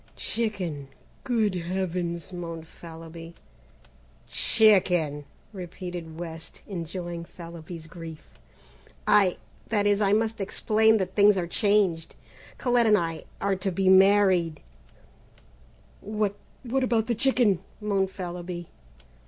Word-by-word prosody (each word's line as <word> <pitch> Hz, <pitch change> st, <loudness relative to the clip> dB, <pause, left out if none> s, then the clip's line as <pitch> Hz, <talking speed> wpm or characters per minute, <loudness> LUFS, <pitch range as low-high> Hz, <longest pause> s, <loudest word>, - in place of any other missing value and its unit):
"Chicken! 185 Hz, -11 st, -3 dB, 0.4 s
Good 220 Hz, -5 st, +1 dB
heavens!" 175 Hz, -1 st, -3 dB
moaned 165 Hz, -2 st, -6 dB
Fallowby. 165 Hz, 0 st, -11 dB, 0.9 s
"Chicken," 180 Hz, -9 st, +3 dB, 0.3 s
repeated 175 Hz, -3 st, -7 dB
West, 165 Hz, -2 st, -8 dB
enjoying 175 Hz, -2 st, -5 dB
Fallowby's 170 Hz, -1 st, -9 dB
grief; 165 Hz, -1 st, -11 dB, 0.7 s
"I 205 Hz, -3 st, +4 dB, 0.3 s
that 205 Hz, -2 st, +1 dB
is, 205 Hz, 0 st, +3 dB
I 200 Hz, -1 st, +3 dB
must 220 Hz, 0 st, +1 dB
explain 220 Hz, +3 st, +3 dB
that 190 Hz, -2 st, -2 dB
things 205 Hz, -1 st, +5 dB
are 180 Hz, -, 0 dB
changed. 190 Hz, -3 st, +1 dB, 0.4 s
Colette 245 Hz, -3 st, +2 dB
and 210 Hz, -1 st, +6 dB
I 165 Hz, -3 st, -3 dB
are 200 Hz, 0 st, +1 dB
to 190 Hz, +1 st, -2 dB
be 190 Hz, +1 st, +2 dB
married 190 Hz, -4 st, +5 dB, 0.8 s
" -, -, -29 dB
"What 210 Hz, -1 st, -1 dB, 0.3 s
what 260 Hz, +2 st, 0 dB
about 230 Hz, -3 st, +2 dB
the 240 Hz, -, 0 dB
chicken?" 235 Hz, -5 st, +3 dB, 0.2 s
groaned 200 Hz, -3 st, 0 dB
Fallowby. 175 Hz, -2 st, -6 dB
185 Hz, 110 wpm, -26 LUFS, 170-210 Hz, 0.9 s, and